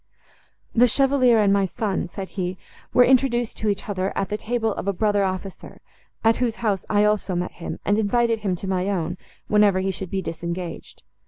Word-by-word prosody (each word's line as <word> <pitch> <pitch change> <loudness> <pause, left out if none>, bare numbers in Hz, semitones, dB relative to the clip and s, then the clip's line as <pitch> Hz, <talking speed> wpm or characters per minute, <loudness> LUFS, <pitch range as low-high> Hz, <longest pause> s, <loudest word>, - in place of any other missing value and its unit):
"The 245 +1 +5
Chevalier 260 -1 +3
and 205 -2 +4
my 200 -1 +3
son," 190 -1 -2
said 195 -2 -6
he, 185 -1 -3 0.3
"were 250 - +6
introduced 245 -3 +2
to 215 - -1
each 200 -1 -2
other, 190 -1 -1
at 195 - -1
the 210 - -1
table 225 0 -1
of - - -6
a 200 - +1
brother 205 +1 +1
officer, 190 0 -5 0.4
at 225 0 +4
whose 240 -3 0
house 200 -3 +1
I 205 0 +3
also 210 -3 +1
met 175 +1 -2
him, - - -4
and 205 +2 +2
invited 230 +2 +1
him 195 -4 -1
to 190 - -7
my 190 0 0
own, 180 -2 -2 0.3
whenever 210 -2 +4
he 190 +1 0
should 190 -1 -6
be 190 +1 -2
disengaged. 170 +1 -6
200 Hz, 195 wpm, -23 LUFS, 185-225 Hz, 0.4 s, were